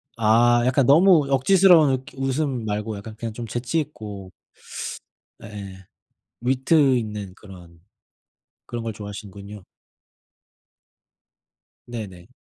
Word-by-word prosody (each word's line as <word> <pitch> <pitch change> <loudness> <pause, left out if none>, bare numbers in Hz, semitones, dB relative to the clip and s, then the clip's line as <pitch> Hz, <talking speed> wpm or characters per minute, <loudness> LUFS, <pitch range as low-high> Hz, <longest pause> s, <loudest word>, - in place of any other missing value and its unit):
아 120 +2 +4
약간 130 0 +2
너무 160 +1 +5
억지스러운 165 +2 +5
이렇게 130 +1 -4
웃음 135 -3 -2
말고 105 +1 -3
약간 110 +2 -9
그냥 115 -2 -5
좀 120 +1 -6
재치 120 +7 -2
있고 105 - -7 1.1
예예. 100 -3 -10 0.6
위트 130 +2 +3
있는 105 -5 -5
그런 90 -5 -15 0.9
그런 120 -1 -6
걸 115 - -3
좋아하시는군요. 100 -1 -9 2.2
네네. 105 -6 -8
115 Hz, 225 characters per minute, -23 LUFS, 105-135 Hz, 2.2 s, 너무